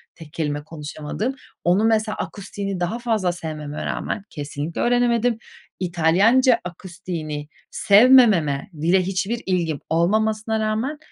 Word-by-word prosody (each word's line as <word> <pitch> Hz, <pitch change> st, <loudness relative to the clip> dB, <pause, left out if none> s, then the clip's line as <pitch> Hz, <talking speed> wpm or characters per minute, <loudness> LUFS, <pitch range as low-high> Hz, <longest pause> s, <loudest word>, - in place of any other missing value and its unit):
tek 160 Hz, -2 st, -13 dB
kelime 150 Hz, -3 st, -2 dB
konuşamadığım... 155 Hz, -, -5 dB, 0.3 s
Onu, 180 Hz, +5 st, +3 dB
mesela 220 Hz, -1 st, +1 dB
akustiğini 200 Hz, -1 st, -5 dB
daha 180 Hz, +7 st, -2 dB
fazla 220 Hz, -7 st, 0 dB
sevmeme 155 Hz, -3 st, -6 dB
rağmen 210 Hz, -, -3 dB
kesinlikle 145 Hz, +2 st, -5 dB
öğrenemedim. 240 Hz, -1 st, +2 dB, 0.4 s
İtalyanca 190 Hz, +9 st, +3 dB
akustiğini 170 Hz, -4 st, -6 dB, 0.2 s
sevmememe, 205 Hz, -, +5 dB
dile 180 Hz, +3 st, +3 dB
hiçbir 195 Hz, +5 st, -2 dB
ilgim 170 Hz, -6 st, -1 dB
olmamasına 215 Hz, +6 st, +1 dB
rağmen, 220 Hz, +7 st, -1 dB
190 Hz, 110 wpm, -22 LUFS, 160-220 Hz, 0.4 s, sevmememe